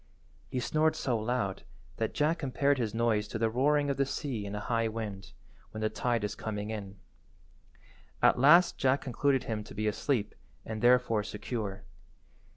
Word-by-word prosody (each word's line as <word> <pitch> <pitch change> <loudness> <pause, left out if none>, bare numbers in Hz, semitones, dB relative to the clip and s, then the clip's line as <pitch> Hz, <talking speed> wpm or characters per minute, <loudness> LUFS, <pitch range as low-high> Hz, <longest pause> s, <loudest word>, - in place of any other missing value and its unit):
He 130 - -2
snored 155 +5 +1
so 125 - -1
loud 110 -3 -1 0.4
that 110 - -2
Jack 155 +3 +1
compared 140 0 +1
his 115 -3 -1
noise 110 -2 +1
to 110 - -4
the 110 0 +1
roaring 145 +4 +2
of 135 - -3
the 140 - +2
sea 125 -8 -3
in 100 - -5
a - - -3
high 115 +1 0
wind, 105 -4 -6 0.4
when 110 - -7
the 110 0 0
tide 115 +1 -1
is 105 - -2
coming 105 -1 -4
in. 100 -2 -6 1.2
At - - +4
last 170 +6 +6
Jack 135 +1 +2
concluded 135 +1 +1
him 110 -2 -3
to - - -12
be 105 +1 -2
asleep 105 0 0 0.3
and 110 -1 -5
therefore 120 -3 +4
secure. 105 -1 -5
115 Hz, 170 wpm, -30 LUFS, 105-135 Hz, 1.2 s, last